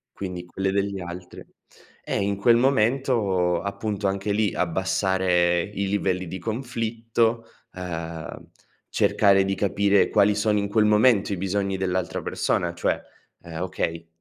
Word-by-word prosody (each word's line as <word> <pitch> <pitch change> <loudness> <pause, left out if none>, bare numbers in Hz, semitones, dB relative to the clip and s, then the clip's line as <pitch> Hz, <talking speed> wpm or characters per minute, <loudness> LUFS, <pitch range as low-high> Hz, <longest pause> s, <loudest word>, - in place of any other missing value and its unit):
Quindi 90 -2 -6
quelle 95 +2 -2
degli 100 0 -1
altre. 90 0 -9 0.6
Eh, - - -2
in 100 0 -1
quel 115 +4 +4
momento, 115 -8 +2
appunto, 100 0 -3
anche 95 +1 -2
lì, 105 0 +1
abbassare 90 0 +1
i 100 +1 -3
livelli 95 -2 -1
di 95 +3 -6
conflitto, 115 +1 -1 0.3
ehm, 85 -2 -7 0.4
cercare 100 -1 +3
di 95 - 0
capire 100 0 +2
quali 100 +1 +4
sono 105 0 +1
in 100 0 -2
quel 105 0 +3
momento 105 -1 +4
i - - -3
bisogni 95 +1 -1
dell'altra 95 -2 -2
persona, - - -1
cioè, - - 0 0.4
ehm: 85 -1 -7
"Okay, 85 -2 -3
100 Hz, 135 wpm, -24 LUFS, 90-105 Hz, 0.6 s, quel